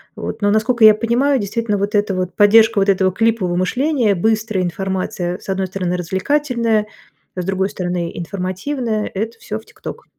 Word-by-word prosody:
вот. - - -6
Но, 205 0 +3
насколько 220 +2 +3
я 215 -1 +8
понимаю, 250 +5 +1
действительно 210 +1 -1
вот 200 +2 -2
эта 205 -2 +1
вот 185 -1 -2
поддержка 215 +1 +5
вот 195 - +2
этого 190 -1 +3
клипового 205 -4 0
мышления, 245 - +1
быстрая 215 0 0
информация, 180 0 -3
с - - -13
одной 190 0 -1
стороны, 180 -1 -2
развлекательная, 225 - 0 0.5
с 180 - -3
другой 190 0 0
стороны, 175 -2 -3
информативная- 200 - -3
это 225 +4 -4
всё 215 0 -5
в 220 - -19
"ТикТок". - - -9
205 Hz, 165 wpm, -18 LUFS, 185-225 Hz, 0.5 s, я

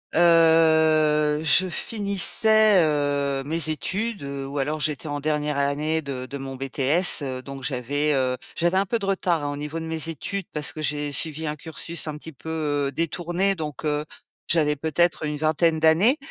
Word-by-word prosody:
Heu, 160 -2 +4
je 185 +5 +4
finissais, 210 +1 +3
heu, 145 -2 0
mes 160 +1 0
études 200 +6 -3
ou 140 0 -5
alors 150 +3 -1
j'étais 150 +1 -1
en 145 -1 -4
dernière 150 -1 -1
année 150 +3 0
de 130 -3 -5
de 140 - -7
mon 135 -1 -7
BTS, 135 +6 +1
heu, 130 -2 -4
donc 135 0 -9
j'avais, 145 +3 -1
heu, 130 -1 +1 0.2
j'avais 175 +2 +2
un 195 - +2
peu 230 +4 -1
de 200 - -4
retard 180 -5 0
hein 145 - -2
au - - -5
niveau 150 +3 -5
de 165 - -6
mes 160 0 -3
études 185 +5 -4
parce 150 -1 -2
que 155 - -7
j'ai 145 -1 -2
suivi 160 +2 -3
un 150 - -2
cursus 165 +2 -4
un 150 - -5
petit 160 +1 -10
peu, 160 +5 -10 0.4
heu, - - -8
détourné, 175 +5 -1
donc, 155 -3 -6
heu, 150 0 0 0.5
j'avais 150 -3 +2
peut-être 160 +3 0
une 150 0 -3
vingtaine 160 +1 +1
d'années 170 - +4
155 Hz, 180 wpm, -24 LUFS, 145-165 Hz, 0.5 s, Heu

